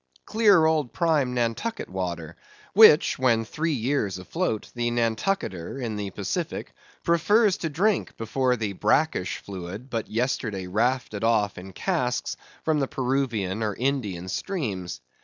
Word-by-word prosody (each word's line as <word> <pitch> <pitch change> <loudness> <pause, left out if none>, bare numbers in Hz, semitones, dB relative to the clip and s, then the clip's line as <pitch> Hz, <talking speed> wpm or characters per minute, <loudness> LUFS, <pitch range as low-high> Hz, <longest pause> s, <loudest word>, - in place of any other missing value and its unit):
Clear 205 -7 +5
old 155 -5 +1
prime 150 -7 +1
Nantucket 120 - -1
water; 85 -3 -4 0.4
which, 195 -11 +7
when 115 -3 +3
three 160 +7 -1
years 120 -6 0
afloat, 110 - -3
the 120 -1 -1
Nantucketer, 115 - -1
in 115 -4 -3
the 105 -1 -3
Pacific, 150 - -4 0.3
prefers 200 +5 +3
to 165 - -3
drink 190 +7 0
before 125 +3 +1
the 110 -4 -3
brackish 105 - +1
fluid, 100 +6 -8
but 115 -2 -3
yesterday 110 -4 -1
rafted 115 +2 0
off 110 -3 +2
in 95 +2 -9
casks, 125 - -1 0.3
from 155 -2 +2
the 135 - 0
Peruvian 125 -7 -1
or 105 -2 -1
Indian 110 -10 -2
streams. 95 - -3
120 Hz, 135 wpm, -26 LUFS, 100-155 Hz, 0.4 s, which